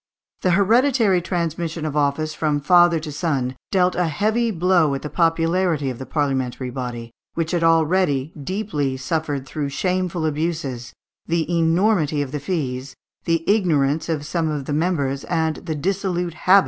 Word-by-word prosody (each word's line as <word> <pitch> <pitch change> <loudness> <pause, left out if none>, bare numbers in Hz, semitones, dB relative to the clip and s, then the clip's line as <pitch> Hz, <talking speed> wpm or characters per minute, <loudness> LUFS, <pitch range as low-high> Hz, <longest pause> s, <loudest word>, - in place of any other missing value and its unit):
The 180 - +2
hereditary 225 -2 +3
transmission 165 -2 -2
of 150 -2 -3
office 150 +2 0
from 150 -2 0
father 175 +2 +5
to 155 -1 -6
son 140 -5 -1
dealt 180 -2 +2
a 180 -1 0
heavy 215 +9 +1
blow 175 -6 +2
at 135 - -6
the 150 - -5
popularity 165 -3 +1
of 120 - -9
the 130 - -7
parliamentary 130 -3 -1
body, 120 -2 -5 0.2
which 165 -1 -1
had 175 -2 0
already 165 -3 +2
deeply 150 -4 -2
suffered 140 0 -2
through 145 +1 -3
shameful 180 +1 -1
abuses, 150 -6 -3 0.3
the 165 -1 0
enormity 165 -2 +2
of 135 - -7
the 150 - -3
fees, 135 -5 -3 0.3
the 165 -1 +1
ignorance 160 -8 +2
of 150 -3 -2
some 160 0 -1
of 145 -3 -3
the 145 - -3
members, 145 -4 0
and 160 -2 0
the 160 -3 -4
dissolute 180 +1 -1
habits 160 - -17
of - - -13
many 185 - +8
others. - - +9
160 Hz, 170 wpm, -22 LUFS, 145-180 Hz, 0.3 s, others